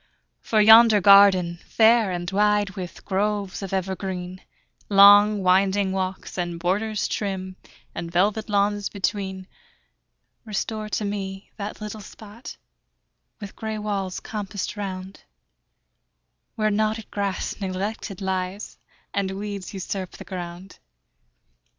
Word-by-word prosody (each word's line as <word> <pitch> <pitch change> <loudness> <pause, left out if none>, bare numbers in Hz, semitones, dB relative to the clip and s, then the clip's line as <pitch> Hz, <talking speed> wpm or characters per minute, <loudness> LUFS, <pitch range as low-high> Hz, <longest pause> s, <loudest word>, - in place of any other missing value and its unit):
For 220 - 0
yonder 220 0 +8
garden, 190 -3 +6
fair 225 -1 +4
and 175 0 -4
wide, 205 0 +2
With 180 -2 -8
groves 200 0 -1
of 195 - -6
evergreen, 185 -1 -4 0.5
Long 205 0 +7
winding 190 +1 +3
walks, 190 0 -4
and 175 -1 -3
borders 205 +5 -1
trim, 190 -2 -4 0.4
And 170 0 -6
velvet 210 +5 +1
lawns 205 0 +1
between; 190 -1 -3 1.0
Restore 215 0 -4
to 210 - -2
me 195 -1 -5
that 210 0 -6
little 210 0 -6
spot, 215 +3 -11 0.8
With 200 -1 -9
gray 220 -1 -4
walls 200 -3 -3
compassed 205 -2 -5
round, 190 -2 -6 1.3
Where 215 -1 +1
knotted 215 +1 -1
grass 200 0 -3
neglected 195 +1 -4
lies, 190 +1 -4 0.3
And 200 -1 -1
weeds 200 0 -6
usurp 190 -1 -5
the - - -11
ground. 180 0 -8
200 Hz, 115 wpm, -24 LUFS, 190-210 Hz, 1.3 s, yonder